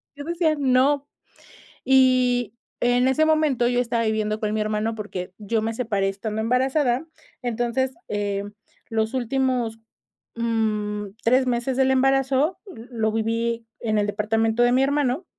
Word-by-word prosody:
yo 285 - -7
decía: 335 -1 +1
"No", 280 +2 +2 0.8
y 255 -3 +3 0.2
en 245 +1 +3
ese 290 +4 +3
momento 305 -6 +2
yo 245 0 +1
estaba 235 -1 0
viviendo 215 0 -1
con 210 -1 -1
mi 220 - 0
hermano, 215 +1 -1
porque, 190 -4 -6
yo 215 +1 -1
me 225 +1 -2
separé 205 -5 0
estando 215 +2 -4
embarazada, 255 +3 +1 0.4
entonces, 245 +2 -1 0.2
eh, 200 -1 -2 0.5
los 220 +1 -1
últimos, 250 -2 -1 0.6
mm, 210 -3 -1
3 255 +3 +3
meses 250 +1 -1
del 265 0 +3
embarazo, 270 +5 +2
lo 230 - -3
viví 230 +1 -1
en 215 -2 0
el 205 - 0
departamento 225 +2 +1
de 245 - +4
mi 255 +1 +3
hermano. 285 +3 +1
240 Hz, 140 wpm, -23 LUFS, 220-265 Hz, 0.8 s, de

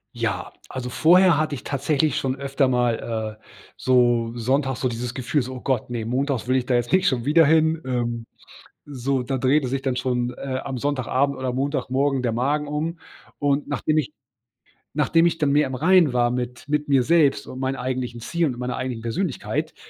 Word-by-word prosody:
Ja, 115 -1 -3 0.2
also 125 -1 -5
vorher 175 +5 +5
hatte 155 0 0
ich 125 - -9
tatsächlich 145 +1 0
schon 130 -1 -1
öfter 140 0 0
mal, 115 -3 -1
äh, - - -33 0.3
so 120 -2 +2
sonntags 130 +2 0
so 130 - +2
dieses 120 +1 -4
Gefühl 130 +4 0
so: 130 +1 -6
„Oh 125 - -8
Gott, 130 -4 -1
ne, 120 -2 -3
montags 130 +1 -1
will 130 - +2
ich 130 -2 +1
da 125 - +1
jetzt 120 -1 0
nicht 185 +1 +3
schon 120 -3 0
wieder 160 +3 +5
hin, 160 +1 +3
ähm. 120 -2 -2 0.6
So, 135 -1 -1
da 130 +1 -2
drehte 135 +2 +2
sich 135 +2 -2
dann 135 -2 -1
schon, 125 -1 -1
äh, 130 -1 -3
am 135 -2 -4
Sonntagabend 140 +1 0
oder 130 -1 -1
Montagmorgen 135 0 0
der 120 -2 0
Magen 145 +5 0
um 160 +3 -3 0.4
und 145 0 +1
nachdem 155 - 0
ich 150 -1 -1 0.8
nachdem 165 +1 +3
ich 165 - -1
dann 150 -3 +1
mehr 150 +1 +3
im 130 - -5
Reinen 165 0 +4
war 120 -1 +2
mit 125 +1 -4
mit 150 0 -1
mir 135 -3 +4
selbst 155 -1 +3
und 130 - -8
meinen 135 0 -1
eigentlichen 125 -2 -4
Ziel 170 +7 0
und 125 -4 -4
meiner 125 0 -3
eigenen 125 -3 -4
Persönlichkeit, 130 +7 -2
130 Hz, 195 wpm, -23 LUFS, 125-145 Hz, 0.8 s, vorher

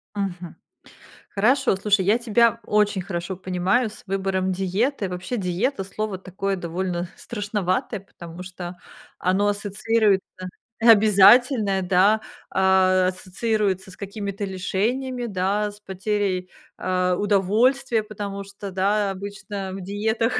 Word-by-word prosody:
Мгм. 180 -4 -4 0.7
Хорошо, 245 +3 +2
слушай, 195 0 +2
я 210 +4 +4
тебя 235 -1 +3
очень 210 -2 +2
хорошо 175 0 -4
понимаю 185 +6 0
с 210 - -13
выбором 190 -1 -1
диеты. 195 +5 -1
Вообще, 180 +7 -4
диета- 195 +4 -1
слово 200 +1 -4
такое, 195 +1 -3
довольно 175 0 -3
страшноватое, 205 +1 -2
потому 175 -2 -11
что 180 -1 -7 0.4
оно 190 +3 +1
ассоциируется 205 0 +1 0.6
обязательное, 215 0 +6
да, 190 +4 +3 0.3
а, 190 -1 +3
ассоциируется 190 +1 -1
с - - -12
какими-то 200 0 -5
лишениями, 240 +7 -2
да, 205 0 -1
с 205 - -15
потерей, 190 -2 -2 0.3
а, 185 -1 0
удовольствия. 215 +5 +2
Потому 200 -2 -6
что, 200 0 -9
да, 200 +2 +1
обычно 200 0 -6
в 195 - -6
диетах 220 +5 0
195 Hz, 115 wpm, -23 LUFS, 185-215 Hz, 0.7 s, обязательное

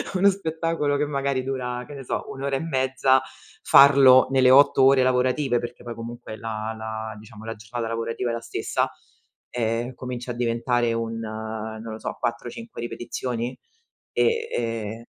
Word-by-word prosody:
Uno 200 +2 +5
spettacolo 165 -5 -1
che 150 - +1
magari 140 -2 -1
dura, 125 -2 -3
che - - -9
ne 135 -1 -8
so, - - -3
1 135 - -9
ora 140 0 0
e - - -4
mezza, 130 -3 +2 0.4
farlo 135 -2 +7
nelle 130 -1 +4
8 135 0 +6
ore 135 -1 +6
lavorative, 125 0 +2
perché 120 +1 -7
poi 120 -1 -6
comunque 115 -1 -8
la 110 -1 -4
la 110 0 -5
diciamo, 110 0 -12
la 115 - -5
giornata 115 +2 -5
lavorativa 115 +1 -2
è - - -2
la 115 - -3
stessa, 115 0 -1 0.6
ehm, 120 +1 -1
comincia 125 -1 -6
a - - -3
diventare 120 0 0
un, 115 0 -2
uhm, 110 0 -5
non 115 -1 -6
lo 110 - -7
so, - - -5
4-5 120 - -5
ripetizioni 120 +1 -4 0.5
e 460 0 +1
ehm 115 -1 -3
120 Hz, 165 wpm, -24 LUFS, 115-135 Hz, 0.6 s, farlo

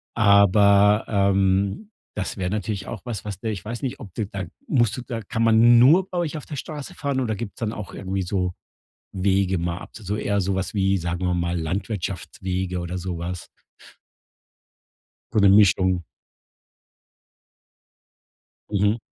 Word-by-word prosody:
Aber, 100 0 +5
ähm, 100 - +1 0.2
das 105 - -3
wäre 90 -2 -2
natürlich 100 -1 -3
auch - - -6
was, 115 -6 -5
was 100 -3 -5
der 110 - -3
ich 95 -4 -6
weiß 120 +5 -6
nicht, 130 - -3
ob 100 -8 -10
du 110 - -1
da 95 -1 -5 0.2
musst 120 -5 +2
du 125 - -5
da 115 -2 -5
kann 115 +2 -2
man 115 +1 +6
nur 165 +10 +5
bei 180 - -4
euch 165 -3 -1
auf 150 - -8
der 150 - -6
Straße 145 +1 -7
fahren 140 -2 -2
oder 110 -4 -1
gibt's 105 +1 -7
dann 115 -3 -1
auch 105 -4 -7
irgendwie 95 0 -3
so 90 -1 -1 0.6
Wege 95 0 +1
mal 85 0 -2
ab? - - -11
So 105 -1 -4
eher 100 -1 0
so 95 +1 -1
was 95 0 -3
wie, 95 -1 +2
sagen 90 +1 -3
wir 90 - +1
mal, 85 0 -1
Landwirtschaftswege 95 0 -3
oder 85 +1 -4
so 90 -1 -4
was? 85 +1 -5 1.9
So - - +3
'ne 100 -1 +6
Mischung. 95 -3 +4 2.7
Mhm, 105 +2 +2
100 Hz, 165 wpm, -23 LUFS, 95-110 Hz, 2.7 s, man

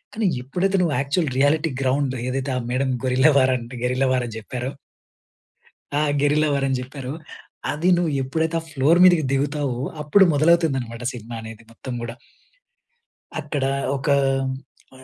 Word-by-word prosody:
కానీ 220 0 -1 0.2
ఎప్పుడైతే 185 +9 0
నువ్వు 165 -5 +1
యాక్చువల్ 140 +3 0
రియాలిటీ 150 +4 +3
గ్రౌండ్ 135 0 +1
ఏదైతే 135 +1 -2
ఆ - - 0
madam 130 +1 0
gorilla 130 +4 +4
war 130 -1 +4
and 120 +1 -9
guerrilla 125 +2 +1
war 125 -1 0
అని 115 - -8
చెప్పారో. 125 +4 -5 1.3
ఆ! - - +2 0.2
గెరిల్లా 150 +2 +2
వార్ 140 -1 +1
అని 135 -1 0
చెప్పారో, 130 0 -7 0.6
అది 160 +5 0
నువ్వు 170 -3 0
ఎప్పుడైతే 160 +5 -1
ఆ - - -10
ఫ్లోర్ 155 +4 +3
మీదకి 175 -4 +6
దిగుతావో, 140 -2 -1 0.2
అప్పుడు 150 +7 +5
మొదలవుతుందనమాట 140 -7 +2
సినిమా 120 -1 -8
అనేది 110 0 -10
మొత్తం 125 +2 -8
గూడా. 115 0 -5 1.2
అక్కడ 145 -2 -2 0.3
ఒక 135 - -6 0.9
హ్మ్, 130 0 -15
135 Hz, 150 wpm, -22 LUFS, 130-155 Hz, 1.3 s, మీదకి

